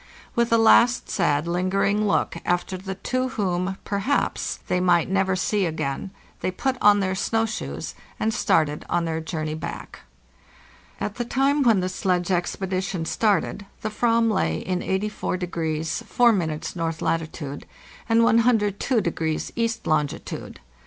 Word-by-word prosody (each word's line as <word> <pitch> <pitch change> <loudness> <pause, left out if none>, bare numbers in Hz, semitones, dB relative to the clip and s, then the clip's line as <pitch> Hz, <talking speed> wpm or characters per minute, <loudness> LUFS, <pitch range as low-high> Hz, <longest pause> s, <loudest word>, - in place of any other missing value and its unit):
With 235 0 +1
a 230 - +6
last 235 +2 +5
sad 145 +2 +1
lingering 195 +4 +1
look 200 - +1
after 175 +1 0
the 190 +1 -5
two 255 +6 -1
whom, 185 -1 -1
perhaps, 205 +8 -1
they 180 - +1
might 180 -1 +3
never 190 -1 +2
see 190 +2 +1
again, 155 +1 -3 0.3
they - - -1
put 260 +8 -1
on 205 -1 +6
their 190 -1 0
snow 225 +4 +1
shoes 220 - -5 0.3
and 220 0 +1
started 150 -6 +1
on 175 -1 +1
their 160 -1 -2
journey 155 -1 -3
back. 155 - -7 1.0
At 210 - -4
the 240 - -1
time 275 +4 +2
when 225 -7 +4
the 180 - -1
sledge 185 -1 0
expedition 185 0 -1
started 205 0 0 0.2
the - - -1
/vam 230 +1 +2
lay 80 - +1
in 185 -1 -2
84° 180 -5 -2
4' 240 +1 +4 0.4
north 165 -1 -2
latitude 155 -3 -3 0.4
and 225 0 +5
102° 215 - +1
east 230 -1 -1
longitude. 150 -2 -2
190 Hz, 140 wpm, -24 LUFS, 170-225 Hz, 1.0 s, a